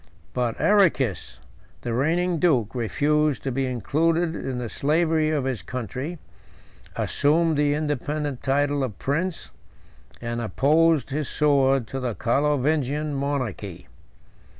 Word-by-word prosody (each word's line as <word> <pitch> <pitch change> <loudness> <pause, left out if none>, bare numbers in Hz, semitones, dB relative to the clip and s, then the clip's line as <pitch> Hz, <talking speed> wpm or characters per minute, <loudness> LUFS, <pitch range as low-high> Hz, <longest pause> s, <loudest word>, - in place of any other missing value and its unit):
But 120 -2 -1
Arrechis, 170 - +2 0.4
the 120 - -3
reigning 165 +7 +1
duke, 130 - +2
refused 145 +5 +1
to 135 - -2
be 135 +1 -1
included 160 - 0
in 130 -5 -4
the 125 -1 -3
slavery 155 +4 +1
of 150 -3 0
his 130 -7 -2
country; 130 - -5 0.8
assumed 160 +3 +2
the 145 0 +2
independent 150 -2 -2
title 145 +1 +1
of 110 -7 -4
prince; 165 +5 -2 0.7
and 120 0 -3
opposed 150 +5 +2
his 145 0 -2
sword 135 -4 +2
to 135 - -4
the 125 -4 -3
Carlovingian 145 +3 0
monarchy. 130 - -3
145 Hz, 120 wpm, -24 LUFS, 125-155 Hz, 0.8 s, Arrechis